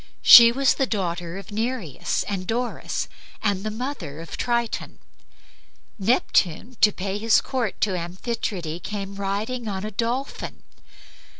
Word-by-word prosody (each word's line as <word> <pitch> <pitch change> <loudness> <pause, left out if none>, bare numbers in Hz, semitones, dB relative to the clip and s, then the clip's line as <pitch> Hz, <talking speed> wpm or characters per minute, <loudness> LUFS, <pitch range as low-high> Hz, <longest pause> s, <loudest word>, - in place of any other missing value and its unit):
She 235 -1 +11
was 270 +2 +3
the 270 - 0
daughter 175 -4 -3
of 195 - -10
Nereus 220 - -2
and 190 -3 -4
Doris, 240 +2 -2 0.3
and 200 -3 0
the 215 - -2
mother 215 - -5
of 165 - -7
Triton. 235 -2 -2 1.0
Neptune, 210 0 +1
to 210 - +7
pay 195 +1 -4
his 225 +1 +4
court 245 -6 -3
to 195 -3 +1
Amphitrite, 175 -1 -4
came 200 0 -5
riding 205 +5 -3
on 195 -2 -3
a 215 - -4
dolphin. 240 +6 -3
210 Hz, 130 wpm, -24 LUFS, 185-235 Hz, 1.0 s, She